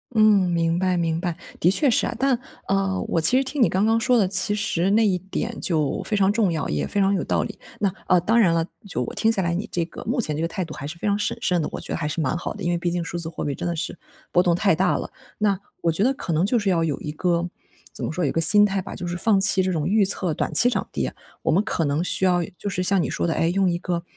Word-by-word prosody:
嗯， 210 -4 +5
明 165 0 +1
白 185 -1 +1
明 165 -1 -1
白。 175 -2 -3 0.2
的 175 - +4
确 275 +10 +3
是 235 - +2
啊， - - -4
但 265 -1 +2 0.3
呃， 195 -1 0
我 165 - 0
其 245 +11 +4
实 270 - +3
听 270 0 -3
你 - - +5
刚 195 +3 +1
刚 225 +1 +3
说 245 +2 +3
的， 200 - +3
其 200 +2 +1
实 180 -3 0
那 220 +2 +4
一 185 -3 +1
点 190 +2 -4
就 155 -5 0
非 210 - -2
常 195 0 +3
重 210 -5 +2
要， 160 -3 -2
也 75 -1 -2
非 205 - -2
常 195 0 +3
有 195 - 0
道 - - 0
理。 - - -8 0.2
那 195 -3 0
呃， 180 - +5
当 225 +6 +2
然 190 -7 +4
了， 165 -1 +1 0.2
就 125 -9 -2
我 - - -6
听 225 0 +2
下 195 -4 0
来 170 - 0
你 205 +6 -3
这 170 -2 -1
个 - - -10
目 245 +4 -1
前 155 -10 -1
这 155 - -3
个 165 - 0
态 180 +2 -4
度 155 - -9
还 140 - -6
是 170 - -7
非 190 - -3
常 205 0 +2
审 210 - -1
慎 180 -3 +1
的， - - -3
我 - - -5
觉 - - -5
得 - - -1
还 150 - -2
是 155 - -3
蛮 150 +2 0
好 175 - -4
的， 205 - -8
因 175 - 0
为 175 - +1
毕 175 +1 -1
竟 175 0 -2
数 170 +1 -5
字 165 -1 -5
货 165 - -5
币 145 - -1
真 175 - -4
的 170 - -2
是 170 +2 -4 0.3
波 175 - +4
动 175 -2 +2
太 195 0 +2
大 180 +3 +1
了。 - - -6 0.3
那 200 -3 +1 0.2
我 170 - +2
觉 165 +5 0
得 260 - +3
可 220 - -4
能 160 +3 +2
就 230 +5 +2
是 205 -3 +1
要 165 -2 +1
有 155 -4 -2
一 150 - -4
个 170 +2 0 0.5
怎 - - -7
么 - - -2
说 175 +1 -1
有 140 - +1
一 - - -1
个 165 - 0
心 205 +6 +6
态 195 -2 -1
吧， - - -8
就 180 - -6
是 175 - -3
放 200 +3 +2
弃 195 -1 +4
这 185 - 0
种 160 -2 -1
预 210 +2 +3
测 185 -3 0
短 - - -2
期 245 - +5
涨 - - -2
跌， - - -2 0.3
我 - - +1
们 190 +6 +3
可 165 -7 -1
能 145 +4 0
需 190 - +1
要 175 -2 +2
就 - - -6
是 185 -2 -2
像 190 0 +2
你 - - -3
说 - - -1
的， 165 - 0
诶， 165 - +1
用 190 0 +2
一 170 - 0
个， 175 -1 -3
180 Hz, 335 characters per minute, -23 LUFS, 170-205 Hz, 0.5 s, 心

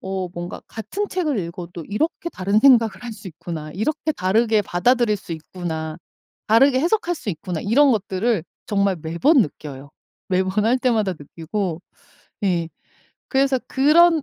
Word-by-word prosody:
'어 190 -1 -3
뭔가 175 +1 -6
같은 295 - -4
책을 315 - -1
읽어도 170 -1 -6
이렇게 315 +10 -1
다른 200 +3 +1
생각을 235 -4 +5
할 235 - -5
수 200 -2 -9
있구나. 160 -1 -7
이렇게 305 - -1
다르게 215 +1 +2
받아들일 225 +4 +2
수 175 - -8
있구나. 160 -1 -5 0.5
다르게 255 +4 +5
해석할 350 +1 +1
수 260 - -8
있구나.' 170 0 -4
이런 265 +6 +4
것들을 205 -1 0 0.2
정말 200 -2 +1
매번 170 - +3
느껴요. 140 -3 -8 0.4
매번 190 +2 +1
할 245 +3 +3
때마다 225 -6 +1
느끼고 165 +4 -4 0.6
예 170 -4 +1 0.6
그래서 270 -1 +2
그런 315 +3 +5
205 Hz, 310 characters per minute, -22 LUFS, 175-260 Hz, 0.6 s, 생각을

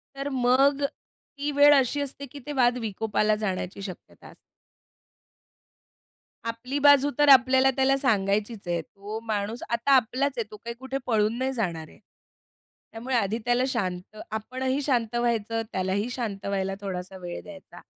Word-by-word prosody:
तर 275 +1 -4
मग 265 +3 +3
ती 285 +1 -7
वेळ 290 +1 +7
अशी 275 +1 +2
असते 280 0 -6
की 290 - -9
ते 295 - -5
वाद 250 -2 +3
विकोपाला 215 -1 0
जाण्याची 195 -2 -3
शक्यता 190 -2 -10
असते. - - -15 2.1
आपली 250 +5 -4
बाजू 285 0 +6
तर 290 -1 +4
आपल्याला 260 0 +6
त्याला 270 0 +3
सांगायचीच 210 -4 0
आहे. 170 -1 0
तो 205 +6 -8
माणूस 215 +1 -2
आता 235 +4 0
आपलाच 260 +3 +2
आहे, 230 - 0
तो 210 - -9
काही 235 +2 -7
कुठे 265 +1 -4
पळून 220 0 +1
नाही 260 +1 -1
जाणार 170 -10 -3
आहे. - - -19 0.9
त्यामुळे 245 +3 -3
आधी 220 -1 +1
त्याला 245 +1 +2
शांत 190 -4 -3
आपणही 260 +5 -2
शांत 240 -5 0
व्हायचं, 230 -2 0
त्यालाही 190 +4 -1
शांत 215 -6 -4
व्हायला 195 -1 -1
थोडासा 190 -1 -5
वेळ 175 -1 -7
द्यायचा 190 -3 -12
235 Hz, 150 wpm, -26 LUFS, 200-265 Hz, 2.1 s, वेळ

